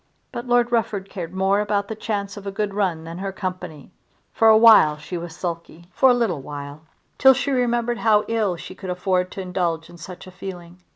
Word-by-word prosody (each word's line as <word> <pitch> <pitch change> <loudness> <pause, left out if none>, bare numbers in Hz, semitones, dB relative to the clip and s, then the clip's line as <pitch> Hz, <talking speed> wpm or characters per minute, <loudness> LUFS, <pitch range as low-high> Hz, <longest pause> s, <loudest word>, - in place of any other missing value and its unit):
But 240 +1 -6
Lord 245 0 +2
Rufford 205 -4 -1
cared 170 -4 -6
more 190 +2 +1
about 205 -1 -1
the 220 - -4
chance 205 -2 -4
of 200 -1 -9
a - - -2
good 205 0 -2
run 185 -6 -1
than 165 +2 -8
her 195 0 -3
company! 185 -6 -6 0.4
For 225 - +3
a 220 0 +8
while 220 -10 +7
she 165 +4 -8
was 170 -1 -6
sulky; 170 -1 -6
for 265 - +4
a - - +6
little 210 - -1
while, 145 +1 -8 0.4
till 265 0 +7
she 275 +2 -1
remembered 240 -2 0
how 210 -2 +3
ill 220 -5 0
she 170 - -9
could 190 0 -9
afford 180 0 0
to 195 - -5
indulge 175 -3 -2
in 175 - -13
such 180 +2 -10
a 185 - -12
feeling. 180 -2 -9
190 Hz, 215 wpm, -22 LUFS, 175-220 Hz, 0.4 s, a